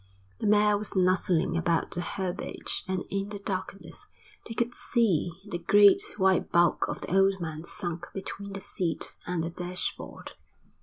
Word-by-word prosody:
The - - -1
mare 210 0 +4
was 210 - -2
nuzzling 185 -2 +2
about 170 -1 +1
the 175 - -2
herbage 185 +1 -3
and 185 -1 -1
in 195 0 -2
the 205 - -5
darkness 195 - -5 0.4
they 225 - -6
could 235 +1 0
just - - -7
see 205 -9 +3 0.2
the 175 -4 -3
great 200 +3 +6 0.2
white 190 -2 +2
bulk 170 -1 +3
of - - -4
the 185 - -2
old 195 0 +4
man 160 -1 -5
sunk 175 -2 -4
between 200 +1 -6
the 195 - -5
seat 175 -3 -2
and 175 -2 -1
the 165 - -3
dashboard. 180 +1 -4
190 Hz, 165 wpm, -28 LUFS, 175-200 Hz, 0.4 s, great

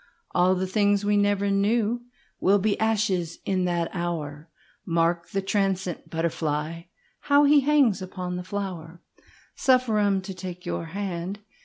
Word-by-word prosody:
All 185 +1 +3
the 185 +1 -1
things 205 +1 +2
we 205 0 +3
ever 200 0 +1
knewWill 215 0 0
be 205 +1 +1
ashes 200 -6 0
in 185 -2 0
that 170 -2 -1
hour, 165 -3 -4 0.3
Mark 170 0 0
the 195 -1 -2
transient 195 -3 -1
butterfly, 160 0 -2 0.3
How 285 0 +4
he 290 0 +6
hangs 275 -8 +3
upon 180 -1 -5
the 180 - -4
flower. 180 -4 -6 0.5
Suffer 255 -5 +2
me 195 -1 +2
to 190 0 -7
take 180 -1 -8
your - - -3
hand. 190 +2 -4
190 Hz, 140 wpm, -25 LUFS, 175-205 Hz, 0.5 s, he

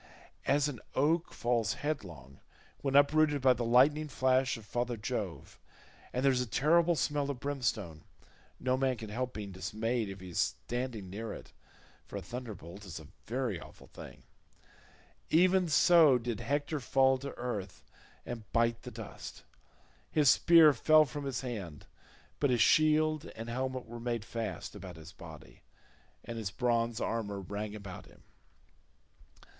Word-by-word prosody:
As 145 +1 +3
an 135 -6 -5 0.2
oak 160 +5 +2
falls 115 -4 0
headlong 85 - -5 0.4
when 135 -1 -1
uprooted 145 +1 +4
by 130 -1 +6
the 120 0 -3
lightning 135 +6 +4
flash 130 -2 +1
of 110 - -12
father 120 +1 -2
Jove, 105 - -5 0.5
and 125 +2 -1
there 135 - +6
is 125 -1 +1
a 125 - -3
terrible 165 +9 +3
smell 145 -2 0
of 140 -3 -4
brimstone—no 125 - -4
man 130 -2 +1
can 110 -2 -8
help 125 +3 -3
being 105 -2 -5
dismayed 110 +4 -2
if 95 0 -8
he 95 0 -9
is 85 - -3 0.3
standing 120 -6 -4
near 110 +3 -5
it, - - -11 0.5
for - - -6
a - - -4
thunderbolt 105 -6 -8
is 90 -6 -7
a 80 - -13 0.2
very 120 -6 -2
awful - - -13
thing—even 185 +2 -3
so 155 -3 +6
did 115 -2 -4
Hector 145 +5 -1
fall 130 0 +3
to 140 +1 -7
earth 105 -7 -5 0.4
and 115 -4 -7
bite 115 0 +1
the - - -8
dust. - - -9 0.7
His 150 -3 +5
spear 165 -3 +7
fell 155 +5 +5
from 145 +1 -6
his 135 -4 -2
hand, 100 - -6 0.5
but 145 - +2
his 125 -1 +2
shield 155 +1 +4
and 115 +1 -7
helmet 130 +1 -3
were 120 +1 -9
made 115 -2 -3
fast 115 -2 -5
about - - -9
his 80 +2 -11
body, 80 -4 -13 0.6
and 115 0 -6
his 105 -3 -3
bronze 115 +1 0
armour 105 -3 -2
rang 105 +2 -5
about 100 -3 -9
him. - - -20
120 Hz, 150 wpm, -32 LUFS, 105-140 Hz, 0.7 s, spear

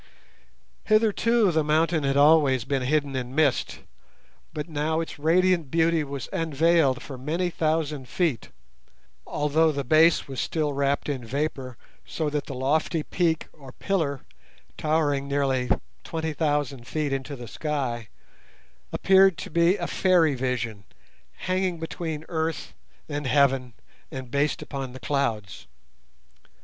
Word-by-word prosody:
Hitherto 220 0 +3
the 160 -1 +1
mountain 160 +2 +2
had 135 0 +1
always 140 -4 +5
been 135 0 -1
hidden 140 +1 0
in 130 0 -4
mist, 150 -4 +1 0.7
but 150 -1 -5
now 160 0 -1
its 165 -2 -5
radiant 170 0 +2
beauty 165 +1 +2
was 140 -2 -6
unveiled 160 -5 +2
for 135 -3 -8
many 170 +7 -1
thousand 155 -5 -1
feet, 150 - -1 0.8
although 155 +2 +2
the 140 -1 -3
base 155 +6 +4
was 135 -2 -4
still 150 -3 -1
wrapped 140 0 0
in 135 -4 -3
vapour 130 0 -3 0.3
so 155 -2 -3
that 150 -1 -2
the 135 - -6
lofty 150 +4 0
peak 165 -1 0
or 135 -4 -13
pillar, 160 -9 -1 0.5
towering 150 -3 0
nearly 135 -3 0 0.3
twenty 160 -1 -3
thousand 145 -5 -1
feet 145 +1 -1
into 135 +1 -4
the 120 -2 -9
sky, 130 -5 -3 0.8
appeared 190 -2 +5
to - - -7
be 170 +4 +3
a - - -3
fairy 175 -5 +3
vision, 120 -5 -3 0.6
hanging 185 -1 0
between 160 -1 -5
earth 160 -1 -3 0.3
and 145 -2 -3
heaven, 135 -3 +2 0.4
and 130 -5 -7
based 145 +1 0
upon 135 -3 -6
the 130 - -9
clouds. 110 -10 -2
150 Hz, 135 wpm, -25 LUFS, 135-160 Hz, 0.8 s, always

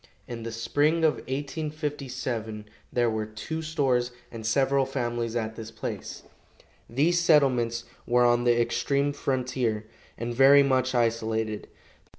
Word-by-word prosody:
In 120 -1 -6
the 115 0 -5
spring 145 +8 +1
of 155 - +3
1857 135 -6 -4 0.3
there 120 -1 +2
were 110 -1 -1
two 135 +9 -5
stores 135 -6 +1 0.2
and 115 -1 -7
several 135 +3 +2
families 120 -3 -2
at 110 -1 -2
this 110 -1 -7
place. - - -6 0.7
These 155 +8 +2
settlements 130 -8 +3 0.2
were 125 0 +4
on 120 0 +3
the 120 -1 +3
extreme 140 +4 +1
frontier, 125 -5 -1 0.3
and 120 +1 -3
very 135 +3 +7
much 130 -1 +1
isolated. 110 -2 0
125 Hz, 130 wpm, -27 LUFS, 115-140 Hz, 0.7 s, very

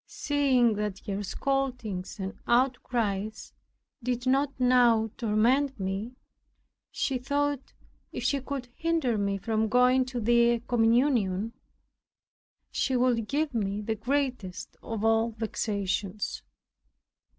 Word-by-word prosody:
Seeing 265 -5 +2
that 210 -2 -2
her 200 -2 -3
scoldings 250 -6 -2
and 195 +2 -4
outcries 235 -4 0 0.5
did 245 0 -2
not 270 +2 +2
now 240 -3 +4
torment 245 +4 +1
me, 195 +6 -3 0.7
she 265 -2 -1
thought, 285 +1 -1 0.4
if - - -5
she 280 -2 +1
could 270 -2 -5
hinder 325 -8 0
me 200 -1 0
from 220 +2 0
going 250 +2 +4
to 250 -1 -4
the 235 +1 +3
communion, 230 -3 +2 1.2
she 265 - 0
would 245 -3 +2
give 290 +2 -1
me 205 -3 -1
the 215 +1 -2
greatest 250 -4 -2
of 225 -1 -4
all 225 +1 +2
vexations. 205 -2 -2
235 Hz, 110 wpm, -28 LUFS, 210-260 Hz, 1.2 s, now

